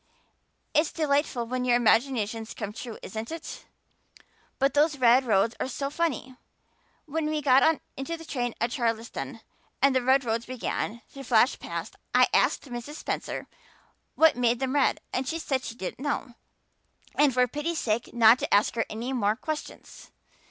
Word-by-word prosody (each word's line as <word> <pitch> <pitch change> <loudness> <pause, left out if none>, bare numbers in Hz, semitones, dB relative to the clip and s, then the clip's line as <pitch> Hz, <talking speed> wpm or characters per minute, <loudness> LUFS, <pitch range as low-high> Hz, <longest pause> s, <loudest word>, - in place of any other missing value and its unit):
It's 305 +1 +3
delightful 285 -5 0
when 250 +2 -2
your 245 -1 +3
imaginations 225 -1 +1
come 210 -2 -5
true, 230 0 -7
isn't 220 +5 -6
it? 330 0 -7 0.9
But 275 +1 +2
those 295 0 +3
red 255 +1 +5
roads 225 0 +2
are - - -1
so 275 +2 -4
funny. 275 -6 -2 0.7
When 315 +1 -2
we 310 0 0
got 290 +3 +4 0.2
into 325 +5 -4
the 325 - -11
train 245 -5 -3
at 235 +1 0
Charlottetown 230 -3 -3 0.4
and 275 0 +4
the 260 - +3
red 260 +1 +3
roads 230 0 -1
began 235 -2 -3
to 275 - -8
flash 245 0 +3
past - - -6 0.2
I - - +6
asked - - +3
Mrs. 245 +4 -7
Spencer - - -4 0.7
what 320 -1 +5
made 240 -1 +1
them 265 -1 -1
red 285 -2 +2
and 255 0 -1
she 325 - -1
said 270 -5 -2
she 230 - -6
didn't 190 -1 -6
know 275 -3 -3 0.8
and 295 -2 +4
for 250 0 +3
pity's 295 +6 -3
sake 225 -2 -1
not 235 +1 +6
to - - -3
ask 205 +1 +4
her 230 - -1
any 235 +5 -4
more 215 -4 +1
questions. 305 +5 -7
255 Hz, 165 wpm, -27 LUFS, 235-285 Hz, 0.9 s, I